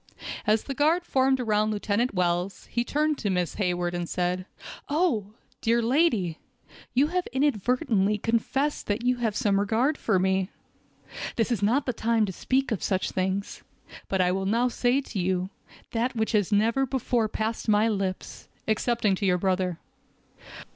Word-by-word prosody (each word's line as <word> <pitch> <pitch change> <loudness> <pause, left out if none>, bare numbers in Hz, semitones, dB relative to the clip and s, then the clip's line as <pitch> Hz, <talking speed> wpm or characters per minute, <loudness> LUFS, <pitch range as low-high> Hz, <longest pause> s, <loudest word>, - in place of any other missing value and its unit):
As 215 +1 +3
the 275 - -4
guard 315 +6 +2
formed 265 -2 +2
around 215 -3 +1
Lieutenant 215 +2 0
Wells, 180 +1 -1
he 235 - +1
turned 300 +3 0
to 205 - -1
Miss 180 -3 0
Hayward, 175 -2 0
and 175 -1 -3
said: 180 +1 -1 0.4
"Oh! 250 - 0 0.3
dear 230 +1 +2
lady, 230 - +1 0.6
you 280 +4 +4
have 360 +1 -1
inadvertently 240 -5 +1
confessed 235 +7 -1
that 210 +4 -1
you 250 0 +2
had 225 -4 -1
some 205 -5 +2
regard 230 +9 +1
for 210 -4 +2
me. 190 0 +1 0.9
This 230 +1 0
is 230 - 0
not 245 +8 +2
a 255 - +1
time 225 -1 +1
to 190 - -5
speak 265 +7 0
of 215 - -1
such 190 -2 0
things, 190 +2 -2 0.5
but 190 -1 +1
I 180 0 +3
will 190 +1 -1
now 235 +4 +2
say 245 +3 +1
to 230 -6 -5
you, 185 +1 -1 0.4
that 240 +3 -1
which 220 -1 0
has 210 -3 +1
never 230 +6 +2
before 245 -3 0
passed 220 +1 -3
my 210 +1 +4
lips, 195 -4 -3 0.2
excepting 220 -1 +1
to 200 - -2
your 180 -1 +3
brother. 185 -2 0
220 Hz, 165 wpm, -26 LUFS, 190-250 Hz, 0.9 s, you